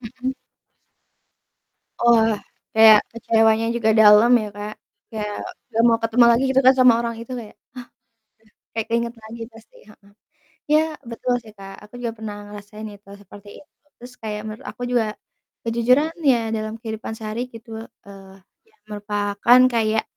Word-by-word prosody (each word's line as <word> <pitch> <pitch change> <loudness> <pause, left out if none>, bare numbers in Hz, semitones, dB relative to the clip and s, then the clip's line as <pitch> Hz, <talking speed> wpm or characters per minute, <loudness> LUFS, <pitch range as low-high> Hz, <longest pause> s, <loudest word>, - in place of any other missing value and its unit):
Mhm. 255 +3 -5 1.7
Wah, 225 -2 +4 0.4
kayak 220 -1 +8
kecewanya 225 -1 +2
juga 220 -2 +1
dalam 210 +2 +7
ya, 210 - -5
Kak. 210 +1 -6 0.4
Kayak 210 -2 -5 0.3
nggak 225 - +1
mau 230 -1 +3
ketemu 230 +2 +4
lagi 235 +3 +3
gitu 265 0 +3
kan 260 - +8
sama 250 -2 +7
orang 235 -1 -3
itu, 235 +2 -9
kayak, 215 -3 -10
ah - - -55 1.0
ah - - -77
kayak 225 -1 -2
keingat 235 +1 -1
lagi 225 +2 -10
pasti, 225 0 -18
heeh. 200 -1 -21 0.6
Iya, 305 +1 +5 0.3
betul 245 +2 -2
sih, 215 -2 -15
Kak. 195 0 -10
Aku 215 - -23
juga 235 - -2
pernah 215 -1 -6 0.2
ngerasain 210 +1 -10
itu 200 0 -20
seperti 205 +1 -15
itu. - - -29 0.3
Terus 245 +1 -12
kayak 210 -1 -4
menurut 215 0 -8
aku 215 +4 -11
juga 240 -3 +1 0.6
kejujuran 250 +7 +2 0.2
ya 240 - +2 0.2
dalam 215 0 -4
kehidupan 220 -1 -6
sehari 220 +1 -5
gitu, 230 +1 -12 0.4
eee, 195 -1 -13 0.3
iya 435 - -32
merupakan 205 +3 +2
kayak, 220 -1 +1
225 Hz, 155 wpm, -21 LUFS, 210-235 Hz, 1.7 s, kayak